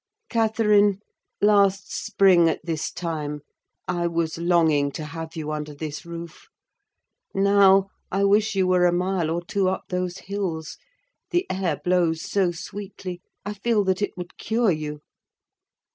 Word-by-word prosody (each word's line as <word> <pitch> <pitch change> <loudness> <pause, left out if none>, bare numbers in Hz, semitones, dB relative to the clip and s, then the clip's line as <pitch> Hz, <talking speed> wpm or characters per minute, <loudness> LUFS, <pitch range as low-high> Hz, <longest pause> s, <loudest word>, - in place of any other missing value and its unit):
Catherine, 210 -3 +3 0.4
last 200 -1 +3
spring 180 -4 +4
at 160 - -3
this 160 -3 -2
time, 150 -4 -4 0.5
I 175 -1 0
was 165 -1 -2
longing 160 -5 +3
to 155 - -5
have 160 +1 -7
you 155 -2 -4
under 150 -1 -5
this 155 +2 -6
roof; 170 -1 -9 0.9
now, 195 0 +5 0.2
I 195 +1 +1
wish 205 +1 +3
you 190 -1 +3
were 180 -1 +4
a - - +3
mile 180 -1 0
or 170 +1 -2
two 195 0 +1
up 190 - -3
those 180 0 -2
hills: 185 -6 -4 0.5
the 355 -1 +1
air 180 -6 -1
blows 175 -3 +1
so 195 -3 +1
sweetly, 185 0 -7 0.2
I 210 - -3
feel 210 +1 +1
that 190 0 0
it 205 - -2
would 180 0 -8
cure 225 -2 +1
you." 150 -2 -4
180 Hz, 145 wpm, -24 LUFS, 165-200 Hz, 0.9 s, now